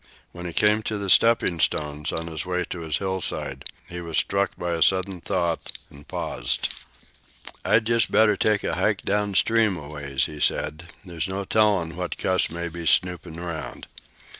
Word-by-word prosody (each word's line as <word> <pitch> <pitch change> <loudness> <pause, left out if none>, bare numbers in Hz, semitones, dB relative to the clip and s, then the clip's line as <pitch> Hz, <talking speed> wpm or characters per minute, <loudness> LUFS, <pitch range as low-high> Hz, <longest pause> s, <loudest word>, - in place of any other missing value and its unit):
When 90 0 -7
he - - -4
came 105 +3 +4
to 110 0 -3
the 100 -2 -1
stepping 115 -7 +4
stones 75 -1 0
on 80 - -3
his 80 -1 -4
way 90 0 -1
to 90 - -4
his 80 -2 -1
hillside, 95 -2 -2 0.2
he 90 0 -6
was 85 -1 -3
struck 100 0 0
by 90 0 -3
a 85 -1 -2
sudden 95 0 +2
thought, 85 -4 -1 0.2
and 70 0 -15
paused. - - -2 0.9
"I'd 110 0 +3
just 115 0 +2
better 110 -1 +5
take 105 -1 +1
a - - -1
hike - - 0
down 105 -1 0
stream 110 -2 +3
a 75 -3 -8
ways," 75 -2 -1
he 75 -2 -8
said. 75 +4 -1
"There's 85 -2 -3
no 95 +1 -3
tellin' 100 -6 +2
who 90 +1 -4 0.4
may 85 +1 -4
be 85 0 -6
snoopin' 90 -2 +1
around." 85 -2 -6
90 Hz, 175 wpm, -24 LUFS, 80-100 Hz, 0.9 s, better